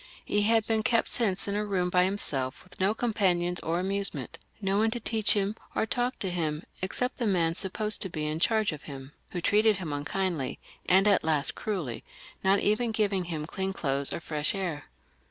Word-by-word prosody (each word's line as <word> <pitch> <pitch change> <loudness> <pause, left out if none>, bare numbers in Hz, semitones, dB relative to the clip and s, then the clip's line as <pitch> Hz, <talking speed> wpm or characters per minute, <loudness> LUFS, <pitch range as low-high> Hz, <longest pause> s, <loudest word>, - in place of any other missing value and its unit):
He 205 - +1
had 220 +1 +3
been 220 -1 +1
kept 230 +1 +2
since 205 -6 +3
in 200 - -1
a 210 +1 0
room 185 -3 0
by 180 0 +4
himself 140 -9 -2
with 185 - -14
no 195 +3 +2
companions 180 -7 +1
or 165 +2 -1
amusement 190 -7 -2
— - - -34
^no 195 +1 +2
one 220 +1 +3
to 240 +2 -3
teach 220 -2 +2
him 205 0 0 0.2
or - - +2
talk 245 +3 -1
to 190 - -3
him 155 -3 -1 0.2
except 250 +7 -1
the 235 - 0
man 170 -4 +2
supposed 210 +4 -1
to 190 - -2
be 155 -3 -3
in 155 +1 -1
charge 215 +2 +2
of 150 -2 -7
him, 135 0 -8 0.2
who 175 - -4
treated 210 +2 +4
him 165 -5 -4
unkindly, 150 -1 -2 0.3
and 190 +3 +5
at 200 - +4
last 155 -2 +1
cruelly, 170 - -4 0.4
not 190 +1 +4
even 225 +3 +2
giving 200 -4 +1
him 160 -3 -3
clean 190 +3 -3
clothes 140 -5 -1
or - - -2
fresh 155 +1 -1
air. 175 -7 -2
190 Hz, 205 wpm, -28 LUFS, 165-210 Hz, 0.4 s, and